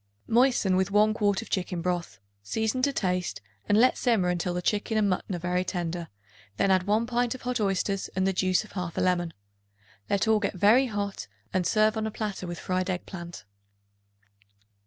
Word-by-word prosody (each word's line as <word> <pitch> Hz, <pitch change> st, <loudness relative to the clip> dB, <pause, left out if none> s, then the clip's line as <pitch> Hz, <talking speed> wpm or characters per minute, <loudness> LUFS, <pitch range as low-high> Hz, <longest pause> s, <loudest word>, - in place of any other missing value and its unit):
Moisten 240 Hz, -5 st, +3 dB
with 190 Hz, +1 st, +1 dB
1 210 Hz, +1 st, +4 dB
quart 205 Hz, -2 st, +1 dB
of -, -, -15 dB
chicken 180 Hz, -2 st, -1 dB
broth, 175 Hz, 0 st, -2 dB, 0.2 s
season 220 Hz, -, -1 dB
to 280 Hz, +2 st, +2 dB
taste 180 Hz, -7 st, -1 dB, 0.3 s
and 205 Hz, -, +4 dB
let 255 Hz, +3 st, +4 dB
simmer 220 Hz, -7 st, +2 dB
until 180 Hz, 0 st, -1 dB
the 180 Hz, -, -1 dB
chicken 215 Hz, +3 st, 0 dB
and 210 Hz, -1 st, +3 dB
mutton 185 Hz, 0 st, -1 dB
are -, -, -2 dB
very 180 Hz, +1 st, -1 dB
tender; 175 Hz, -2 st, -3 dB, 0.5 s
then 195 Hz, -, +2 dB
add 185 Hz, 0 st, +2 dB
1 215 Hz, +3 st, +2 dB
pint 245 Hz, 0 st, 0 dB
of 260 Hz, -, -11 dB
hot 250 Hz, 0 st, -1 dB
oysters 195 Hz, 0 st, 0 dB
and 190 Hz, 0 st, +1 dB
the 195 Hz, -, +1 dB
juice 185 Hz, +1 st, +2 dB
of 215 Hz, -, -15 dB
1/2 180 Hz, -3 st, -5 dB
lemon. 175 Hz, -2 st, +1 dB, 0.8 s
Let 200 Hz, +2 st, +1 dB
all 220 Hz, -1 st, +4 dB
get 205 Hz, -1 st, -2 dB
very 220 Hz, +8 st, +5 dB
hot 200 Hz, -, -4 dB, 0.3 s
and 185 Hz, -2 st, +1 dB
serve 215 Hz, 0 st, +3 dB
on 220 Hz, 0 st, -1 dB
a -, -, -4 dB
platter 205 Hz, -4 st, -4 dB
with 175 Hz, 0 st, -5 dB
fried 185 Hz, +1 st, -2 dB
egg 180 Hz, -1 st, -2 dB
plant. 170 Hz, -, -8 dB
195 Hz, 195 wpm, -27 LUFS, 180-215 Hz, 0.8 s, very